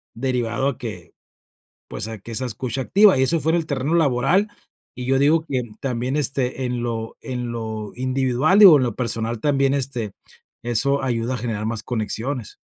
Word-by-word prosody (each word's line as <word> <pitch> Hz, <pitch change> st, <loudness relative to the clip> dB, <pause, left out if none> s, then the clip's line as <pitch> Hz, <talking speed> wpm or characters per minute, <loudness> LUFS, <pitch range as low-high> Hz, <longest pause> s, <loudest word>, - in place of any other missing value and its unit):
derivado 125 Hz, +1 st, -1 dB
a 140 Hz, -, -5 dB
que, 90 Hz, -8 st, -7 dB, 0.8 s
pues, -, -, -4 dB
a 110 Hz, -1 st, -7 dB
que 115 Hz, -, -10 dB
esa 130 Hz, +3 st, -2 dB
escucha 125 Hz, +2 st, -3 dB
activa, 195 Hz, +5 st, +5 dB
y -, -, +4 dB
eso 165 Hz, +5 st, +2 dB
fuera 160 Hz, +4 st, +2 dB
el 165 Hz, -, -2 dB
terreno 140 Hz, +2 st, -1 dB
laboral. 160 Hz, +6 st, +2 dB, 0.5 s
Y 125 Hz, -, -6 dB
yo 135 Hz, +1 st, +2 dB
digo 155 Hz, +3 st, +3 dB
que 130 Hz, -3 st, -1 dB, 0.2 s
también, 125 Hz, 0 st, -2 dB
este, 135 Hz, -2 st, -1 dB
en 125 Hz, -1 st, -2 dB
lo 115 Hz, -1 st, -4 dB
en 125 Hz, -2 st, -4 dB
lo 110 Hz, -3 st, -5 dB
individual, 130 Hz, +7 st, +1 dB
digo, 190 Hz, -7 st, +10 dB
en 130 Hz, -, +1 dB
lo 120 Hz, -4 st, -2 dB
personal 115 Hz, -1 st, -1 dB
también, 135 Hz, -1 st, +2 dB
este, 125 Hz, -6 st, -2 dB, 0.5 s
eso 130 Hz, +4 st, +1 dB
ayuda 120 Hz, -1 st, -1 dB
a -, -, -3 dB
generar 110 Hz, -2 st, -3 dB
más 115 Hz, -1 st, -2 dB
conexiones. 120 Hz, +1 st, -3 dB
125 Hz, 180 wpm, -22 LUFS, 115-140 Hz, 0.8 s, digo